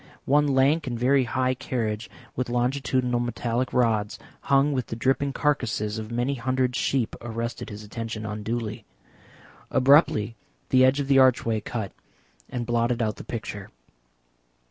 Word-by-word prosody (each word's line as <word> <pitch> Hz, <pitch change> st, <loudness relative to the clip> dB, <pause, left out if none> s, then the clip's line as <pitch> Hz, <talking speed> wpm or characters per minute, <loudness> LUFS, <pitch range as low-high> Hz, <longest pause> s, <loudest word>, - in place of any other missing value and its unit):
One 145 Hz, +2 st, +3 dB
lank 140 Hz, +3 st, +3 dB
and 120 Hz, -2 st, -2 dB
very 130 Hz, +2 st, +3 dB
high 130 Hz, +1 st, 0 dB
carriage 115 Hz, -4 st, -3 dB, 0.3 s
with 125 Hz, -1 st, -2 dB
longitudinal 125 Hz, 0 st, 0 dB
metallic 120 Hz, +1 st, -1 dB
rods 110 Hz, -4 st, +1 dB, 0.3 s
hung 140 Hz, +1 st, +3 dB
with 130 Hz, -3 st, -2 dB
the -, -, -4 dB
dripping 135 Hz, +4 st, +1 dB
carcasses 115 Hz, -7 st, -1 dB
of 110 Hz, 0 st, -6 dB
many 120 Hz, +4 st, 0 dB
hundred 130 Hz, 0 st, 0 dB
sheep 130 Hz, -3 st, 0 dB
arrested 115 Hz, 0 st, -4 dB
his 105 Hz, 0 st, -8 dB
attention 110 Hz, 0 st, -5 dB
unduly. 110 Hz, +1 st, -4 dB, 0.9 s
Abruptly 130 Hz, -5 st, +4 dB, 0.3 s
the 130 Hz, 0 st, +5 dB
edge 130 Hz, +2 st, +4 dB
of 140 Hz, -, -2 dB
the 135 Hz, -1 st, +5 dB
archway 120 Hz, -4 st, +3 dB
cut 105 Hz, -2 st, -4 dB, 0.6 s
and 120 Hz, -1 st, -3 dB
blotted 120 Hz, 0 st, +1 dB
out 110 Hz, -3 st, -1 dB
the -, -, -8 dB
picture. 105 Hz, -4 st, -6 dB
120 Hz, 145 wpm, -25 LUFS, 115-130 Hz, 0.9 s, the